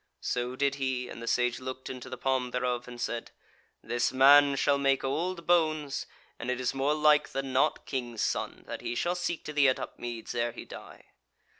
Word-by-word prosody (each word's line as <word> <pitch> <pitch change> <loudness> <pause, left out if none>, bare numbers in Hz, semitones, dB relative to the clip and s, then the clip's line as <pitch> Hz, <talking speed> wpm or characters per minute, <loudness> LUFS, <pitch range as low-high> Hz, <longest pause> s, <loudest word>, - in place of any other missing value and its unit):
So 125 +1 -2
did 140 +1 +1
he, 130 -2 -1
and 115 - -8
the 115 - -7
Sage 125 0 +1
looked 130 0 -6
into 130 -2 -7
the 130 - -6
palm 130 -1 0
thereof, 125 -1 -2
and 120 -1 -9
said: 120 -1 -3 0.5
"This 120 0 0
man 140 +2 +7
shall 140 +1 +2
make 135 -1 +2
old 170 +6 -2
bones, 155 -5 +1 0.3
and 120 - -4
it 125 0 -1
is 125 -1 0
more 135 +3 +1
like 150 -1 +4
than 135 -1 -3
not, 130 - +2
King's 120 -4 -3
son, - - -2
that - - -6
he - - -3
shall 175 +8 0
seek 175 -2 -3
to 155 - -5
thee 140 -2 +5
at 130 - 0
Upmeads 120 -2 -6
ere 120 -1 -1
he - - -9
die." - - -12
130 Hz, 200 wpm, -29 LUFS, 125-145 Hz, 0.5 s, man